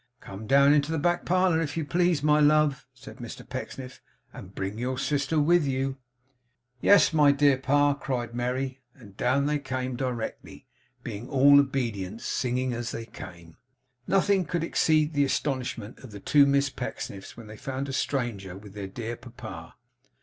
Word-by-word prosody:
'Come 100 Hz, 0 st, -9 dB
down 140 Hz, +2 st, +6 dB
into 150 Hz, +1 st, +2 dB
the 160 Hz, -, 0 dB
back 175 Hz, +3 st, 0 dB
parlour, 180 Hz, -2 st, +2 dB
if 160 Hz, 0 st, -3 dB
you 160 Hz, -, -1 dB
please, 175 Hz, -2 st, +1 dB
my 150 Hz, 0 st, +4 dB
love,' 150 Hz, -1 st, +3 dB
said 130 Hz, +1 st, -13 dB
Mr 120 Hz, -3 st, -9 dB
Pecksniff, 130 Hz, 0 st, -7 dB, 0.3 s
'and -, -, -11 dB
bring 95 Hz, +3 st, -4 dB
your 125 Hz, +1 st, -2 dB
sister 145 Hz, +3 st, 0 dB
with 170 Hz, +3 st, +4 dB
you.' 135 Hz, -1 st, -1 dB, 0.9 s
'Yes, 200 Hz, -5 st, +5 dB
my 150 Hz, -2 st, +6 dB
dear 140 Hz, -1 st, +4 dB
pa,' 145 Hz, +2 st, +2 dB
cried 125 Hz, -4 st, -4 dB
Merry; 130 Hz, +2 st, -2 dB
and 105 Hz, -7 st, -15 dB
down 130 Hz, +5 st, +1 dB
they 150 Hz, 0 st, 0 dB
came 130 Hz, -2 st, -3 dB
directly 125 Hz, -3 st, -5 dB, 0.4 s
(being 115 Hz, +1 st, -6 dB
all 140 Hz, +1 st, +6 dB
obedience), 115 Hz, -7 st, -2 dB
singing 125 Hz, 0 st, -1 dB
as 120 Hz, 0 st, -4 dB
they 115 Hz, -, -5 dB
came. 85 Hz, -6 st, -12 dB, 0.5 s
Nothing 195 Hz, 0 st, +3 dB
could 170 Hz, +1 st, -2 dB
exceed 155 Hz, -2 st, +2 dB
the 145 Hz, -1 st, +3 dB
astonishment 130 Hz, -5 st, -2 dB
of 130 Hz, -, -11 dB
the 105 Hz, -1 st, -9 dB
two 140 Hz, +7 st, +4 dB
Miss 140 Hz, -1 st, +2 dB
Pecksniffs 100 Hz, -7 st, -7 dB
when 115 Hz, -, -10 dB
they 110 Hz, 0 st, -10 dB
found 135 Hz, +4 st, -4 dB
a 135 Hz, -, -5 dB
stranger 115 Hz, -10 st, -2 dB
with 100 Hz, 0 st, -13 dB
their 100 Hz, -2 st, -6 dB
dear 115 Hz, +4 st, -5 dB
papa. 110 Hz, -9 st, -10 dB
135 Hz, 170 wpm, -27 LUFS, 120-145 Hz, 0.9 s, down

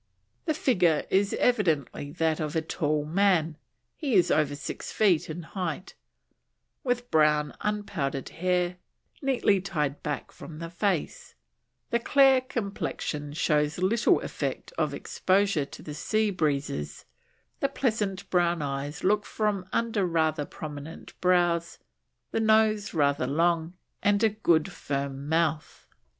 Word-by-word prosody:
The 315 Hz, -3 st, 0 dB
figure 180 Hz, -, +2 dB
is 200 Hz, +1 st, +2 dB
evidently 160 Hz, -, +1 dB
that 160 Hz, -2 st, 0 dB
of 155 Hz, -1 st, -3 dB
a 160 Hz, -, +2 dB
tall 150 Hz, -1 st, -1 dB
man 165 Hz, -2 st, +2 dB, 0.4 s
he 275 Hz, -8 st, -1 dB
was 180 Hz, -, +4 dB
over 145 Hz, -2 st, +2 dB
six 140 Hz, -, -6 dB
feet 190 Hz, -8 st, +2 dB
in 165 Hz, +2 st, -5 dB
height 180 Hz, 0 st, -4 dB, 0.9 s
with 245 Hz, -1 st, -1 dB
brown 150 Hz, -2 st, +3 dB
unpowdered 190 Hz, -10 st, -2 dB
hair, 180 Hz, 0 st, 0 dB, 0.4 s
neatly 250 Hz, -8 st, +2 dB
tied 150 Hz, -7 st, -2 dB
back 150 Hz, -2 st, -4 dB
from 155 Hz, -, -10 dB
the 165 Hz, +1 st, -6 dB
face; 200 Hz, -, -2 dB, 0.6 s
the 235 Hz, -, +2 dB
clear 270 Hz, +1 st, +5 dB
complexion 200 Hz, -, -4 dB
shows 150 Hz, -2 st, +1 dB
little 200 Hz, +6 st, +3 dB
effect -, -, -4 dB
of -, -, 0 dB
exposure 190 Hz, -5 st, +1 dB
to -, -, -12 dB
the 150 Hz, -, -7 dB
sea 215 Hz, +7 st, 0 dB
breezes, 145 Hz, -, -2 dB, 0.5 s
the 275 Hz, -, +1 dB
pleasant 210 Hz, -7 st, -1 dB
brown 175 Hz, -3 st, +2 dB
eyes 140 Hz, +1 st, -4 dB
look 205 Hz, +2 st, +3 dB
from 205 Hz, -4 st, -2 dB
under 230 Hz, -3 st, 0 dB
rather 160 Hz, -4 st, +1 dB
prominent 150 Hz, +2 st, -8 dB
brows, 175 Hz, -2 st, +2 dB, 0.5 s
the -, -, 0 dB
nose 215 Hz, -2 st, +3 dB
rather 140 Hz, -4 st, +2 dB
long, 165 Hz, +3 st, +1 dB, 0.3 s
and 205 Hz, +1 st, +2 dB
a 220 Hz, -, +6 dB
good 195 Hz, -5 st, +1 dB
firm 140 Hz, -2 st, -4 dB
mouth. 160 Hz, -2 st, 0 dB
175 Hz, 130 wpm, -27 LUFS, 150-205 Hz, 0.9 s, a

